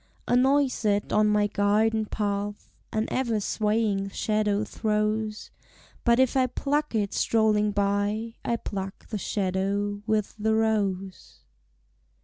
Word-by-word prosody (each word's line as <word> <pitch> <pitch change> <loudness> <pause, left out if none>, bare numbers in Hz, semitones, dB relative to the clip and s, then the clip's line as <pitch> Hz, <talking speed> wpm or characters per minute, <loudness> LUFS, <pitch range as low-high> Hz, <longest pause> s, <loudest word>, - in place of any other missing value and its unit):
A - - +3
noisette 255 -6 +2
on 215 0 +4
my 210 0 +3
garden 215 +2 +1
path 205 -1 -3 0.2
An 220 0 0
ever 235 -4 0
swaying 210 -1 0
shadow 210 0 0
throws; 215 0 -2 0.5
But 235 0 +4
if 260 0 +3
I 260 -1 +3
pluck 290 +2 -1
it 205 -2 0
strolling 215 -2 +2
by, 205 +2 0
I 235 - 0
pluck 195 -4 -6
the 215 - -3
shadow 200 +2 -1
with 215 -2 0
the 220 +1 +2
rose. 200 -4 -1
210 Hz, 125 wpm, -26 LUFS, 205-225 Hz, 0.5 s, on